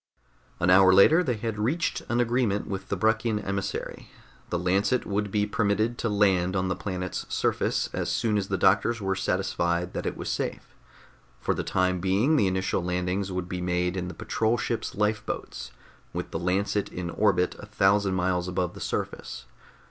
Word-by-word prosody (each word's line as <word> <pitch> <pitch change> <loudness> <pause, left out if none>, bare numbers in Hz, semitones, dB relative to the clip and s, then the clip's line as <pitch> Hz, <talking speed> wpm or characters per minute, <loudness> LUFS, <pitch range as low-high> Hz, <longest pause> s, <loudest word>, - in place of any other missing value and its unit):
An 90 +1 +3
hour 95 0 +7
later 155 - +6
they 125 -8 0
had 110 -1 -4
reached 145 +11 0
an 120 - +1
agreement 120 -4 +1
with 95 -1 -5
the - - 0
Bruckian 110 +2 +1
emissary. 100 0 -4 0.4
The 85 - 0
Lancet 100 +7 +1
would 105 0 -1
be 105 +1 +1
permitted 105 +2 0
to 115 - 0
land 95 -3 +2
on 95 -1 0
the 95 - 0
planet's 90 -2 -4
surface - - 0
as - - -2
soon 110 -2 +1
as 100 -2 0
the - - -1
doctors 115 0 +3
were 95 -1 0
satisfied 85 -2 -1
that - - -3
it - - -3
was - - -6
safe. - - -3 0.7
For - - 0
the - - -3
time 90 0 +1
being 100 - +2
the 115 -10 +3
initial 95 -1 0
landings 90 +2 -1
would 90 -1 -3
be 90 0 -4
made 90 0 0
in 90 -1 -3
the 90 - -7
patrol 115 +2 0
ship's 115 -2 -3
lifeboats, 105 0 -2 0.4
with - - -4
the - - -3
Lancet 100 +3 0
in 90 -1 -4
orbit 95 -4 +2
a 100 - -9
thousand 100 -2 +2
miles 90 -1 0
above 90 -1 -1
the - - -10
surface. - - -4
100 Hz, 180 wpm, -27 LUFS, 90-105 Hz, 0.7 s, hour